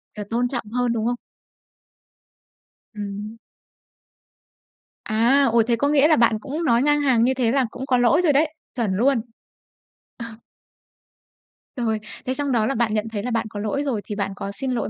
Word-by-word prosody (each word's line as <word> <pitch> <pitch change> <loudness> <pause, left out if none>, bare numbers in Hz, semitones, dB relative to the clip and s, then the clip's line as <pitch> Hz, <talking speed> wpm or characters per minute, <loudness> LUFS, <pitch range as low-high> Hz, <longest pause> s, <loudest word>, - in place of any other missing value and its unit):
Là 210 - -5
tôn 240 +2 0
trọng 240 -2 -4
hơn, 245 0 0
đúng 225 -1 -2
hông? 245 - +1 1.8
Ừm. 210 +2 -6 1.7
À! 240 +5 +3
Ôi. 230 -1 +5
Thế 235 - +3
có 285 +5 0
nghĩa 295 0 +4
là 315 - +5
bạn 230 -3 +3
cũng 290 +6 -4
nói 240 -5 +3
ngang 295 +1 +2
hàng 255 -5 +3
như 260 - +3
thế 250 -3 +1
là 270 0 +2
cũng 265 - -6
có 255 -2 +2
lỗi 245 +8 +4
rồi 325 -5 +3
đấy, 305 +2 +2 0.2
chuẩn 225 -7 -1
luôn. 245 +3 +2 1.0
Ờ. 235 - -6 1.5
Rồi. 225 -4 -1 0.3
Thế 255 - -1
xong 285 0 -2
đó 230 -3 +2
là 270 +4 -1
bạn 225 -2 +1
nhận 215 +1 -1
thấy 205 -2 -4
là 250 - -3
bạn 230 0 -1
có 205 - -7
lỗi 215 +7 -2
rồi, 250 -7 -2
thì 210 - -5
bạn 200 -1 -2
có 200 - -5
xin 260 +6 -4
lỗi 245 - -2
240 Hz, 190 wpm, -22 LUFS, 220-275 Hz, 1.8 s, Ôi